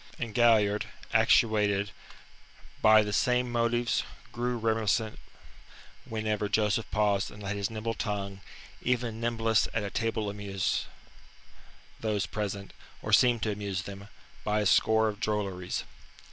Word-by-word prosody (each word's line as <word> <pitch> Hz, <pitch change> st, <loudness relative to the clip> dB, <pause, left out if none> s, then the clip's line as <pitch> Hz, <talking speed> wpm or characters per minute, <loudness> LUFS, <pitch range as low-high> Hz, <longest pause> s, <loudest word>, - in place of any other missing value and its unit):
And 115 Hz, -3 st, -4 dB
Galliard 105 Hz, -3 st, +4 dB, 0.3 s
actuated 105 Hz, -3 st, +3 dB, 0.9 s
by 110 Hz, 0 st, +7 dB
the 105 Hz, 0 st, -3 dB
same 125 Hz, +1 st, +2 dB
motives 120 Hz, 0 st, +1 dB, 0.3 s
grew 120 Hz, +1 st, -2 dB
reminiscent 110 Hz, -1 st, 0 dB, 0.9 s
whenever 110 Hz, -2 st, -2 dB
Joseph 105 Hz, +1 st, +1 dB
paused 105 Hz, -2 st, +1 dB
and 105 Hz, -1 st, -11 dB
let 100 Hz, +1 st, -2 dB
his 100 Hz, -1 st, -1 dB
nimble 115 Hz, 0 st, -3 dB
tongue 100 Hz, -4 st, -4 dB, 0.4 s
even 120 Hz, -2 st, -1 dB
nimblest 115 Hz, -2 st, +2 dB
at 115 Hz, -, 0 dB
a 100 Hz, -, -4 dB
table 115 Hz, -2 st, -1 dB
amuse 100 Hz, -2 st, -2 dB, 1.1 s
those 105 Hz, -3 st, -1 dB
present, 100 Hz, -2 st, -4 dB, 0.3 s
or -, -, -3 dB
seem 120 Hz, -2 st, +5 dB
to 110 Hz, -, 0 dB
amuse 100 Hz, -3 st, -3 dB
them, 100 Hz, +1 st, -9 dB, 0.4 s
by 105 Hz, 0 st, +1 dB
a -, -, -1 dB
score 110 Hz, +3 st, +4 dB
of 105 Hz, -1 st, -4 dB
drolleries. 100 Hz, -5 st, -2 dB
105 Hz, 130 wpm, -29 LUFS, 100-115 Hz, 1.1 s, by